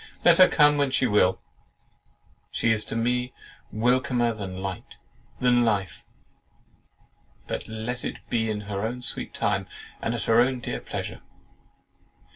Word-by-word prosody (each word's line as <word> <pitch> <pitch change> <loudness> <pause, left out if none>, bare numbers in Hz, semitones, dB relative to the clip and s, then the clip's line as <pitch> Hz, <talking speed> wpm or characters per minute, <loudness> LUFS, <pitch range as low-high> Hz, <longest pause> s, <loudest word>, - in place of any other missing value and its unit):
Let 175 0 +6
her 185 - +10
come 150 -1 +4
when 140 -1 +2
she 130 0 +1
will, 105 -5 +3 1.1
she 115 - +1
is 110 -1 +1
to - - -5
me 125 +2 0 0.4
welcomer 120 +1 +1
than 95 -4 -6
light, 95 -1 -6 0.4
than 125 -1 +4
life; 105 -5 -1 1.4
but - - -5
let 110 +3 -5
it - - -4
be 110 -1 0
in 105 -1 -2
her 100 -1 -4
own 120 +3 -3
sweet - - -3
time, - - -1 0.3
and 115 - -1
at 115 - -3
her 115 0 +4
own 130 +1 +1
dear - - -4
pleasure." - - -6
115 Hz, 145 wpm, -26 LUFS, 105-125 Hz, 1.4 s, her